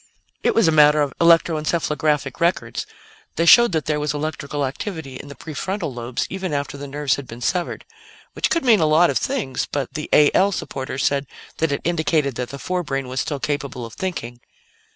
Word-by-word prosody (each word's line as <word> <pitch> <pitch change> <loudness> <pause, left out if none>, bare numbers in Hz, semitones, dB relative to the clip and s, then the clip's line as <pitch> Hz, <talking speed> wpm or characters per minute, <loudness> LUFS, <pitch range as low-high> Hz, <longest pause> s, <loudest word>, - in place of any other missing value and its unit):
"It - - +1
was 225 -6 +4
a - - +4
matter 150 -1 +6
of 140 - -3
electro 165 -1 +5
encephalographic 150 -3 -1
records. 170 +1 0 0.5
They 165 - +1
showed 235 +7 +7
that 160 -2 0
there 150 -1 0
was 150 -1 -1
electrical 145 -1 -3
activity 140 -1 -5
in 145 - -10
the 140 - -10
prefrontal 165 +1 -4
lobes 120 +1 -3
even 190 -4 -4
after 140 -1 -2
the 140 0 -7
nerves 140 -1 0
had 140 -2 -8
been 115 - -9
severed, 175 +8 -2 0.5
which - - 0
could 335 -5 0
mean 225 -4 +6
a 155 - +3
lot 160 +3 +5
of - - +1
things; 240 - -2
but 140 -3 -3
the 155 0 -5
A 150 -1 +6
L 200 +1 +4
supporters 135 -6 -3
said 140 -1 0 0.3
that 160 -2 +1
it 140 - -1
indicated 160 -4 +1
that 125 +1 -4
the 140 - -7
forebrain 135 -4 -3
was 130 +1 -1
still 145 -2 -3
capable 140 -3 -3
of 115 - -10
thinking." 120 -11 -5
150 Hz, 200 wpm, -21 LUFS, 135-170 Hz, 0.5 s, showed